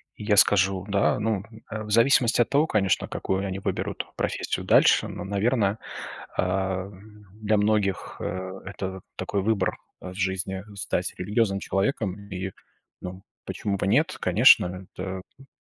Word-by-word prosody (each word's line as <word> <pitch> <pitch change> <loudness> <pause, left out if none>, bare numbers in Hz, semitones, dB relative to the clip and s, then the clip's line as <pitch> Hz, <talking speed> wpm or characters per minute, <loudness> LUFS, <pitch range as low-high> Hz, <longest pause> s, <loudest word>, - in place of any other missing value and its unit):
И - - -9
я 105 -1 +3
скажу, 95 -2 +4
да, 100 0 +2
ну, 105 -2 0 0.3
э, 110 - -4
в 105 - -9
зависимости 120 +1 +4
от 120 - +1
того, 145 +3 +3
конечно, 100 - +1
какую 95 +1 -2
они 95 0 -3
выберут - - -3
профессию - - -2
дальше. - - +5
Но, - - -6
наверно, 100 +1 +1 0.6
а, 95 +1 0 0.4
для 110 0 0
многих, 105 -2 0
э, 95 +1 -4
это 95 0 -5
такой 100 - -2
выбор, 100 -2 0 0.2
э, 90 - -7
в - - -11
жизни- 95 0 -2
стать 100 - -2
религиозным 100 +1 0
человеком. 100 -1 -1
И, 95 +1 -4 0.5
ну, 95 +2 -7 0.2
почему 100 -2 -2
бы 95 - -1
нет, 150 - +2
конечно, 90 -2 +5
это, 95 0 -4 0.2
м 135 - -16
100 Hz, 150 wpm, -26 LUFS, 95-110 Hz, 0.6 s, дальше